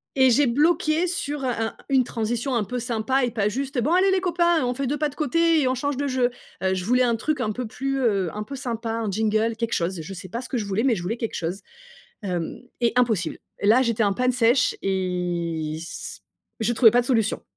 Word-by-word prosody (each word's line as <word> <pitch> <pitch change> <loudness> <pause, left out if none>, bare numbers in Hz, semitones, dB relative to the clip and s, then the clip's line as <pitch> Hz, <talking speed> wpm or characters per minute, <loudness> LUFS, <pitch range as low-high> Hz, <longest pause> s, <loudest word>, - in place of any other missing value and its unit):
et 260 -1 +5
j'ai 280 +4 +4
bloqué 310 +5 +2
sur 295 -5 -3
un 250 -2 0
un - - -9
une 265 -2 +4
transition 240 +3 -2
un 220 - +1
peu 250 +5 -4
sympa 245 +2 0
et 240 - -3
pas 210 -3 0
juste: 270 +2 -2
«Bon, 295 +8 0
allez, 380 +1 +4
les 375 -1 +2
copains, 345 -4 +2
on 245 0 0
fait 275 0 -2
2 295 +3 -1
pas 300 0 0
de 285 - -14
côté 330 +2 +2
et 260 - +2
on 255 - +1
change 285 +1 -2
de 285 0 -1
jeu». 255 -2 +1 0.3
Heu, 190 0 +2
je 180 -1 -3
voulais 250 +2 +3
un 235 -2 +2
truc 300 +7 -2
un 215 - 0
peu 250 +3 -4
plus, 270 +4 -2
heu 200 -8 +1
un 210 - -3
peu 275 +5 -7
sympa, 230 -4 -4
un 225 -2 -2
jingle, 220 +2 +1
quelque 230 0 -2
chose. 170 0 -1
Je 195 +5 -8
sais 185 0 -9
pas 235 +5 -4
ce - - -10
que 255 - -1
je 210 - -2
voulais, 200 +4 -1
mais 250 -4 +3
je 175 - -5
voulais 220 +7 -3
quelque 230 - -4
chose. 175 +4 -3 0.6
Hem 180 +4 -3 0.2
et 235 -1 +2
impossible. 225 -7 +1 0.2
Là, 225 +6 +5
j'étais 230 -3 +1
en 200 - +1
panne 250 +3 +1
sèche 245 +2 +3
et 175 -4 -2
c - - -8 0.4
je 235 +2 +1
trouvais 225 -1 +6
pas 245 - +5
de - - -8
solution. 225 -5 +1
240 Hz, 245 wpm, -24 LUFS, 210-270 Hz, 0.6 s, trouvais